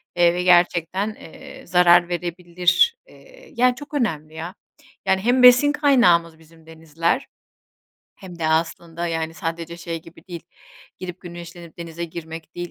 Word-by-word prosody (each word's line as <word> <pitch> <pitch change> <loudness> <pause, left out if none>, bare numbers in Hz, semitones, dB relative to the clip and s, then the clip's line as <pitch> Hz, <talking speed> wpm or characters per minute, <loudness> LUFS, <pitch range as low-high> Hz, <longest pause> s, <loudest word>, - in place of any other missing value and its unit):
eee, 175 -1 +4
ve 180 - -2
gerçekten, 180 +3 +2
eee, - - -13
zarar 175 0 +5
verebilir. 175 - +1
Eee, - - -18
yani, 250 +1 +3
çok 290 +4 -12
önemli 160 - -2
ya. 165 +4 -7 0.5
Yani, 190 -1 +2
hem 245 +3 +2
besin 250 +4 +7
kaynağımız 180 - +3
bizim 160 0 -21
denizler 165 - -2 0.9
hem 180 -3 -12
de 160 - -1
aslında, 165 +1 -2
yani, 165 -1 -3
sadece 170 -1 -5
şey 165 -1 -6
gibi 165 - -17
değil 170 -2 -7 0.6
girip 180 -1 -8
güneşlenip 170 -1 -11
denize 170 0 -6
girmek 160 -1 -9
değil. 175 -1 -6
175 Hz, 140 wpm, -22 LUFS, 165-185 Hz, 0.9 s, besin